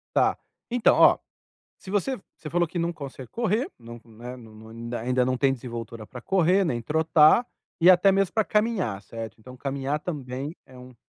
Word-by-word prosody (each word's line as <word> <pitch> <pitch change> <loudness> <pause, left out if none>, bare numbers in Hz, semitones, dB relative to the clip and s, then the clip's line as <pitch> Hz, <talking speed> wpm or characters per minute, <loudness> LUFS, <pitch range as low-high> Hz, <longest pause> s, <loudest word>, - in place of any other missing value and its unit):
Está, - - +3 0.3
então, 240 -1 +3
ó, - - +6 0.6
se 190 - -11
você 210 +7 0 0.2
você 155 - -8
falou 175 +1 +1
que 170 +2 -5
não 170 0 0
consegue 135 -5 -9
correr, 230 +2 0
não, 120 0 -11
né, 120 +2 -9
não 110 -2 -14 0.3
ainda 125 +2 +1
não 130 0 0
tem 135 +1 +2
desenvoltura 115 -3 -7
para 125 - -10
correr, 190 +3 +3
nem 120 -9 -1
trotar, 160 - +4 0.3
e 175 +3 +8
até 185 +2 +6
mesmo 195 -1 +1
para 220 - +2
caminhar, 210 - 0
certo? 115 -2 -8
Então 125 +3 -12
caminhar 140 +2 -2
também 140 -2 -5
é 130 -1 -15
um 125 0 -13
140 Hz, 180 wpm, -25 LUFS, 120-180 Hz, 0.6 s, e